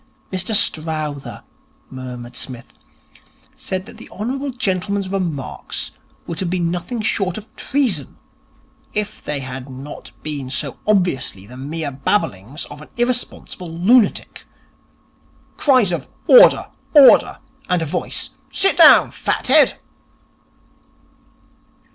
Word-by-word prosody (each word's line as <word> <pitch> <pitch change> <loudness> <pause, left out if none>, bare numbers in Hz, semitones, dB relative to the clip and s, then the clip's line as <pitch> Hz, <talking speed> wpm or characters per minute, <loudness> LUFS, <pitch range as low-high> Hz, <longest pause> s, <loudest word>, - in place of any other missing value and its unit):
'Mr 185 +4 0
Strowther,' 155 -5 0 0.5
murmured 125 -2 -8
Psmith, 125 -3 -7 0.8
'said 185 0 -5
that - - -13
the - - -13
hon. 265 +7 -4
gentleman's 195 -3 -1
remarks 170 -9 -2 0.3
would 170 - -5
have 185 - -2
been 175 -2 0
nothing 180 +7 -4
short 195 -4 -1
of 215 +1 -12
treason, 230 - -1 0.8
if 210 0 -3
they 145 -2 -3
had 130 0 -7
not 135 +3 -9
been 145 -4 -4
so 135 +1 -3
obviously 175 - +1
the 120 +5 -12
mere 145 +3 -4
babblings 135 - -2
of 145 +1 -10
an 150 - -13
irresponsible 240 -7 -3
lunatic. 205 +8 +2 1.1
Cries 255 -10 +3
of 170 - -3 0.2
"Order, - - +7 0.2
order," 280 -3 +7 0.3
and 180 -2 +1
a - - -2
voice, 150 - -3 0.2
"Sit 390 - +3
down, - - +8
fat - - -2
head!"' - - +5
170 Hz, 115 wpm, -19 LUFS, 140-210 Hz, 1.1 s, down